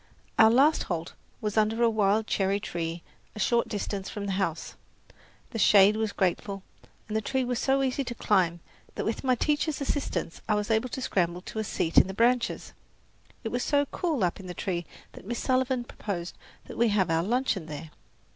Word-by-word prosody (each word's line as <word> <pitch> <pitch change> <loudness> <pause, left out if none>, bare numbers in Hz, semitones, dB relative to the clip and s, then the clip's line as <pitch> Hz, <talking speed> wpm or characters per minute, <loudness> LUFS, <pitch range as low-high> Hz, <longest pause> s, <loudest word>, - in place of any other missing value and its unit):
Our 220 - +9
last 275 +7 +4
halt 170 -1 -3 0.3
was 210 0 -2
under 220 +2 +2
a - - +6
wild 215 -1 +2
cherry 195 -1 +1
tree 170 -3 -4 0.3
a - - -7
short 235 +3 +2
distance 200 -2 -3
from 205 -1 -5
the 200 - -2
house. 185 -4 -2 0.8
The 225 - -4
shade 205 0 +6
was 220 -1 -1
grateful, 195 +1 -1 0.4
and 215 - -4
the 220 - +2
tree 265 +4 0
was 245 -1 -1
so 270 0 +2
easy 265 +1 0
to 240 - -5
climb 175 -6 +1 0.3
that - - -3
with 220 - -2
my 255 -1 +3
teacher's 300 +3 0
assistance 270 - -2
I 210 - +4
was 210 +2 -1
able 225 +3 +1
to 260 - -5
scramble 175 -4 0
to 220 - -6
a - - 0
seat 165 -5 +3
in - - +3
the 190 - -6
branches. 240 +2 +1 0.7
It 225 - -2
was 245 +2 -2
so 285 +1 +2
cool 320 - -1
up 175 +1 0
in 190 - -9
the 180 - -6
tree 175 -3 -3 0.2
that - - -12
Miss 240 +1 -2
Sullivan 255 -1 +1
proposed 185 -7 -5 0.3
that - - -9
we 235 - +5
have 200 -5 +2
our 165 0 +2
luncheon 215 -4 0
there. 155 +1 -7
215 Hz, 200 wpm, -28 LUFS, 190-245 Hz, 0.8 s, Our